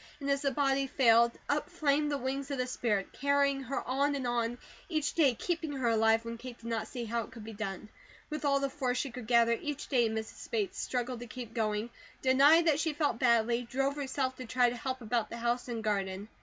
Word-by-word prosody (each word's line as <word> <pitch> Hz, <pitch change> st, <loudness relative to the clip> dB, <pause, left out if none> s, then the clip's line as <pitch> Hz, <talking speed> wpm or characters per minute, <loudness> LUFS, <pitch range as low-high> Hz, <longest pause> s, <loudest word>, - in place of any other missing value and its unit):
And 280 Hz, -1 st, -1 dB
as 275 Hz, 0 st, +1 dB
the 280 Hz, -, +2 dB
body 275 Hz, 0 st, +1 dB
failed, 235 Hz, -3 st, +4 dB
up 295 Hz, +3 st, 0 dB
flamed 300 Hz, -4 st, +1 dB
the 285 Hz, -, 0 dB
wings 270 Hz, +2 st, -3 dB
of 280 Hz, -, -2 dB
the 255 Hz, -, 0 dB
spirit, 220 Hz, -6 st, -1 dB
carrying 280 Hz, 0 st, +2 dB
her 270 Hz, 0 st, -4 dB
on 280 Hz, +3 st, +1 dB
and 270 Hz, -2 st, -3 dB
on, 240 Hz, 0 st, 0 dB, 0.3 s
each 310 Hz, -4 st, 0 dB
day 280 Hz, -7 st, +4 dB
keeping 325 Hz, +1 st, -2 dB
her 260 Hz, -4 st, 0 dB
alive, 225 Hz, 0 st, +3 dB
when 230 Hz, 0 st, -5 dB
Kate 250 Hz, -1 st, -8 dB
did 230 Hz, -, -17 dB
not 230 Hz, -2 st, -2 dB
see 245 Hz, -3 st, -5 dB
how 230 Hz, +1 st, -1 dB
it 220 Hz, -, -8 dB
could 225 Hz, -2 st, -10 dB
be 225 Hz, +1 st, -8 dB
done. 205 Hz, -1 st, -5 dB, 0.4 s
With 305 Hz, 0 st, -4 dB
all 280 Hz, -1 st, +3 dB
the 275 Hz, -, 0 dB
force 255 Hz, -3 st, -1 dB
she 270 Hz, 0 st, -2 dB
could 240 Hz, -2 st, -8 dB
gather, 235 Hz, -1 st, +5 dB
each 290 Hz, +5 st, -4 dB
day 240 Hz, -5 st, +3 dB
Mrs. 220 Hz, 0 st, -6 dB
Bates 210 Hz, -4 st, -1 dB
struggled 245 Hz, -1 st, -2 dB
to 240 Hz, -, -8 dB
keep 235 Hz, -1 st, -8 dB
going, 215 Hz, 0 st, -1 dB, 0.3 s
denied 280 Hz, +6 st, +6 dB
that 305 Hz, -3 st, +3 dB
she 320 Hz, -1 st, 0 dB
felt 290 Hz, -5 st, 0 dB
badly, 235 Hz, -1 st, +3 dB
drove 270 Hz, +3 st, -1 dB
herself 265 Hz, -2 st, -2 dB
to 255 Hz, -, -6 dB
try 245 Hz, 0 st, +3 dB
to -, -, -5 dB
help 260 Hz, +1 st, -4 dB
about 230 Hz, -1 st, -1 dB
the 235 Hz, -, -6 dB
house 240 Hz, +1 st, -1 dB
and 230 Hz, -2 st, -4 dB
garden. 200 Hz, -1 st, -2 dB
250 Hz, 230 wpm, -31 LUFS, 230-275 Hz, 0.4 s, denied